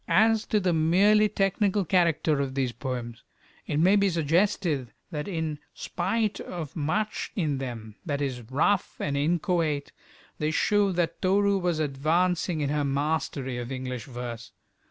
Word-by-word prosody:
As 220 +1 +3
to 215 - +2
the 180 -3 +1
merely 200 +7 +4
technical 195 0 +1
character 165 -4 +2
of 135 -1 -3
these 130 -3 0
poems, 120 -2 -5 0.5
it 145 - -1
may 185 +5 +5
be 200 -1 +3
suggested 165 - +1 0.2
that 150 -3 -4
in 160 -5 -3 0.2
spite 205 +4 -1
of 165 -5 -6
much 175 +8 -1
in 150 -8 0
them 115 -5 -6
that 145 -5 -2
is 130 -4 -2
rough 165 +9 +1
and 140 - -1
inchoate, 160 -1 0 0.5
they 150 - +1
show 205 +5 +2
that 170 -1 -1
Toru 200 +1 +3
was 175 -3 0
advancing 160 +4 +1
in 145 - 0
her 150 0 +1
mastery 140 -2 -1
of 120 +1 -6
English 130 -3 -4
verse. 120 -2 -7
160 Hz, 150 wpm, -27 LUFS, 140-190 Hz, 0.5 s, may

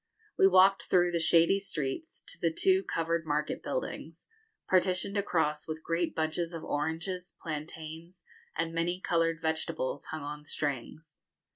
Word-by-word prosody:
We 190 - +6
walked 190 +1 +5
through 175 -1 +4
the 170 - +1
shady 165 +3 +4
streets 165 - -4
to - - -8
the 165 - +2
two 190 +3 +3
covered 165 -2 -1
market 150 -1 -1
buildings, - - -4 0.4
partitioned 185 +1 +2
across 160 -7 0
with 160 0 -5
great 165 0 -1
bunches 165 +2 -1
of 165 - -6
oranges, 165 +5 -3
plantains, 160 +2 -7 0.3
and 165 +1 -1
many 170 +2 0
coloured 165 -2 +1
vegetables, 160 -3 -2
hung 155 -2 -5
on 150 +1 -6
strings. 145 +2 -4
165 Hz, 140 wpm, -30 LUFS, 155-180 Hz, 0.4 s, We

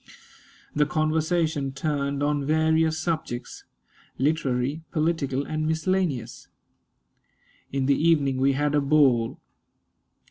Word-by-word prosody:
The 150 0 +3
conversation 155 -2 0
turned 140 0 -2
on 145 -1 0
various 160 +1 +2
subjects 155 -7 -4 0.5
literary, 140 0 0
political, 155 -4 -1
and 155 +1 -2
miscellaneous. 160 -4 -1 1.2
In 135 -1 -1
the 140 - +4
evening 145 -5 +3
we 135 +1 +3
had 145 +2 0
a 145 - +3
ball. 135 -5 +3
150 Hz, 100 wpm, -25 LUFS, 135-160 Hz, 1.2 s, the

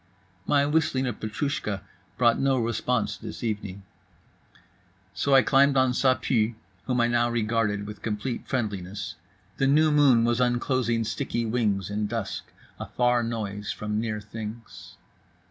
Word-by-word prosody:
My 140 -1 +3
whistling 145 -3 +1
of 120 -4 -3
Petroushka 110 -3 -3 0.3
brought 120 -2 +3
no 135 -1 +2
response 115 0 -1
this - - -8
evening. 100 -3 -4 1.3
So 135 +8 +2
I 130 - +7
climbed 140 0 +4
on 130 -1 +4
Ça 130 +1 +2
Pue, 115 -2 +1 0.3
whom 125 -2 +1
I - - +4
now 120 0 +2
regarded 110 -3 0
with 105 0 -9
complete 115 +3 -3
friendliness; 100 -5 -3 0.4
the 135 - +2
new 155 +3 +4
moon 140 -6 +5
was 120 +1 +1
unclosing 120 -1 +1
sticky 115 +1 -2
wings 105 -4 0
in 105 0 -1
dusk, 115 -2 -4 0.3
a - - -5
far 125 -1 +2
noise 105 -3 -3
from 105 0 -3
near 110 -2 -2
things. 110 +2 -9
115 Hz, 145 wpm, -26 LUFS, 105-130 Hz, 1.3 s, I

